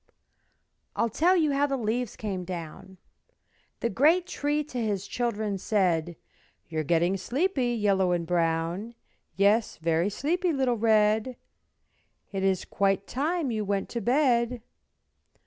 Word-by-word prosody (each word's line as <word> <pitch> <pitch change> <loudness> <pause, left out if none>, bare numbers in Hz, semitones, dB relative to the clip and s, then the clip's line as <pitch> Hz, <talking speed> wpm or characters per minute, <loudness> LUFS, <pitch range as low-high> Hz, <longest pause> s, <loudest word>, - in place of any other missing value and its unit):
I'll 230 -1 0
tell 350 - +3
you 310 -4 +2
how 280 +1 +2
the 275 -1 -1
leaves 235 0 -2
came 195 -4 -4
down. 175 +1 -8 0.8
The 235 - 0
great 315 - +4
Tree 300 -4 -1
to 255 -4 -5
his 205 -3 -1
children 215 -5 -2
said, 175 -5 0 0.5
"You're 155 -1 -2
getting 170 +5 +1
sleepy, 260 - 0
Yellow 195 -4 +2
and 175 -1 0
Brown, 170 +5 -1 0.4
Yes, 205 +3 +2
very 165 +3 +1
sleepy, 340 - 0
little 265 -3 +1
Red; 220 +2 +2 0.9
It 195 -1 -3
is 190 -1 +1
quite 195 0 0
time 300 - -1
you 215 -2 -1
went 200 -1 -2
to 235 - -4
bed." 245 -1 +1
215 Hz, 130 wpm, -27 LUFS, 190-255 Hz, 0.9 s, great